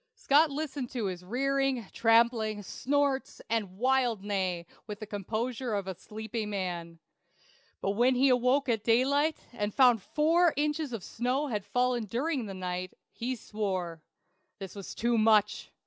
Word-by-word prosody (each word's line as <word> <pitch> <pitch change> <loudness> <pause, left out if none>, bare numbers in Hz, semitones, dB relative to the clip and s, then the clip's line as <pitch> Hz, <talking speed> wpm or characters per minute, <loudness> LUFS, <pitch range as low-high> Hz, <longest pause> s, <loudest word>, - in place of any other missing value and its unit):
Scott 315 - +4
listened 280 -3 -4
to 240 -5 -2
his 180 -2 -4
rearing, 270 +3 0
trampling, 225 -2 +3
snorts, 280 +5 -1
and 205 -5 -1
wild 250 -3 +1
neigh 185 -4 -1 0.2
with 210 -1 -6
the 215 - -6
composure 220 +4 -3
of 200 -2 -2
a 190 - -4
sleepy 220 +4 -6
man; 180 -5 -4 0.8
but 195 - 0
when 245 +5 +3
he 265 +2 +4
awoke 255 +3 +3
at 225 -3 0
daylight, 280 +7 +3 0.2
and 210 -3 -3
found 245 -5 +5
four 325 - +2
inches 295 -1 0
of 225 -6 -5
snow 250 +5 -1
had 210 -4 -2
fallen 245 +2 0
during 250 +3 -2
the 195 - -6
night, 180 0 -4 0.2
he 255 +2 -3
swore. 185 -7 -3 0.6
This 195 -3 -8
was 200 -2 -8
too 235 0 +1
much. 215 -1 +3
230 Hz, 150 wpm, -29 LUFS, 205-265 Hz, 0.8 s, found